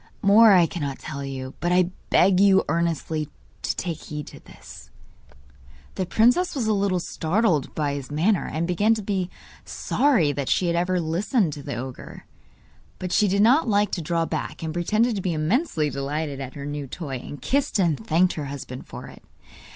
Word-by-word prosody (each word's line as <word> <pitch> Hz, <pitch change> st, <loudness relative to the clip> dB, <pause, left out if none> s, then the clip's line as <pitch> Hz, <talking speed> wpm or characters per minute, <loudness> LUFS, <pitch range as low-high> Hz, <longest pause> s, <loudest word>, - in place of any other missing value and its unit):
More 210 Hz, +3 st, +7 dB
I 180 Hz, -3 st, +6 dB
cannot 145 Hz, -5 st, -4 dB
tell 140 Hz, -2 st, -6 dB
you, 135 Hz, -1 st, -6 dB
but 175 Hz, -, -1 dB
I 180 Hz, 0 st, +3 dB, 0.2 s
beg 185 Hz, 0 st, +4 dB
you 195 Hz, -1 st, +5 dB
earnestly 160 Hz, -2 st, -1 dB, 0.3 s
to -, -, -2 dB
take 165 Hz, -3 st, -4 dB
heed 150 Hz, -1 st, -6 dB
to -, -, -11 dB
this.' -, -, -14 dB, 1.0 s
The 185 Hz, -, -3 dB
princess 245 Hz, -, +3 dB
was 255 Hz, -5 st, -1 dB
a 215 Hz, -, +2 dB
little 195 Hz, -3 st, +1 dB
startled 170 Hz, -, 0 dB
by 145 Hz, -2 st, -1 dB
his 140 Hz, -2 st, -6 dB
manner, 170 Hz, +7 st, +1 dB
and 160 Hz, +2 st, -1 dB
began 205 Hz, +6 st, +2 dB
to 215 Hz, -, -5 dB
be 190 Hz, -3 st, -2 dB, 0.3 s
sorry 245 Hz, -, +1 dB
that 140 Hz, -1 st, -3 dB
she 185 Hz, -, +2 dB
had 170 Hz, -1 st, +1 dB
every 180 Hz, +1 st, +1 dB
listened 175 Hz, -, 0 dB
to 145 Hz, -, -8 dB
the 140 Hz, -2 st, -5 dB
ogre. 125 Hz, +1 st, -8 dB, 0.7 s
But 180 Hz, -1 st, -5 dB
she 210 Hz, +1 st, +3 dB
did 200 Hz, +2 st, +2 dB
not 255 Hz, +4 st, +4 dB
like 205 Hz, 0 st, +2 dB
to 175 Hz, -, -2 dB
draw 165 Hz, +1 st, 0 dB
back, -, -, -4 dB
and 160 Hz, -1 st, -3 dB
pretended 215 Hz, +7 st, +1 dB
to -, -, -2 dB
be 180 Hz, -2 st, -1 dB
immensely 155 Hz, -, 0 dB
delighted 140 Hz, +1 st, -3 dB
at 130 Hz, -1 st, -7 dB
her 140 Hz, -1 st, -7 dB
new 145 Hz, -1 st, -5 dB
toy, 140 Hz, -2 st, -5 dB
and 145 Hz, +3 st, -9 dB
kissed 280 Hz, -3 st, 0 dB
and 160 Hz, -, +1 dB
thanked 170 Hz, +9 st, +2 dB
her 150 Hz, -, -5 dB
husband 135 Hz, -2 st, -7 dB
for -, -, -9 dB
it. -, -, -13 dB
170 Hz, 190 wpm, -24 LUFS, 145-200 Hz, 1.0 s, More